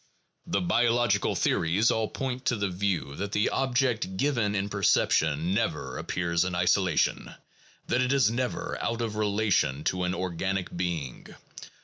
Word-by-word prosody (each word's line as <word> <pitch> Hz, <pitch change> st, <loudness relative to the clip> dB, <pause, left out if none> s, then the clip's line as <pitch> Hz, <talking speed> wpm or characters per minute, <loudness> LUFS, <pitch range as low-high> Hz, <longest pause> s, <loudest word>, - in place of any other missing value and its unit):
The 100 Hz, -, 0 dB
biological 115 Hz, +2 st, +2 dB
theories 95 Hz, +8 st, +2 dB
all 110 Hz, -1 st, 0 dB
point 130 Hz, +1 st, -4 dB
to 120 Hz, -, +2 dB
the 100 Hz, -2 st, -1 dB
view 90 Hz, -7 st, -2 dB
that 100 Hz, +1 st, -4 dB
the 105 Hz, -, +2 dB
object 125 Hz, -7 st, 0 dB
given 115 Hz, -7 st, +1 dB
in 100 Hz, 0 st, -1 dB
perception 85 Hz, -4 st, +2 dB
never 100 Hz, -, -2 dB
appears 85 Hz, -1 st, 0 dB
in 95 Hz, -1 st, -2 dB
isolation, 90 Hz, -1 st, +1 dB, 0.5 s
that 125 Hz, -, +1 dB
it 130 Hz, 0 st, +1 dB
is 135 Hz, -6 st, +3 dB
never 125 Hz, +1 st, -3 dB
out 115 Hz, 0 st, -1 dB
of 110 Hz, -2 st, -3 dB
relation 100 Hz, -9 st, +1 dB
to 90 Hz, +2 st, 0 dB
an 90 Hz, +1 st, -1 dB
organic 95 Hz, +1 st, -3 dB
being. 85 Hz, -7 st, -4 dB
100 Hz, 145 wpm, -27 LUFS, 90-115 Hz, 0.5 s, is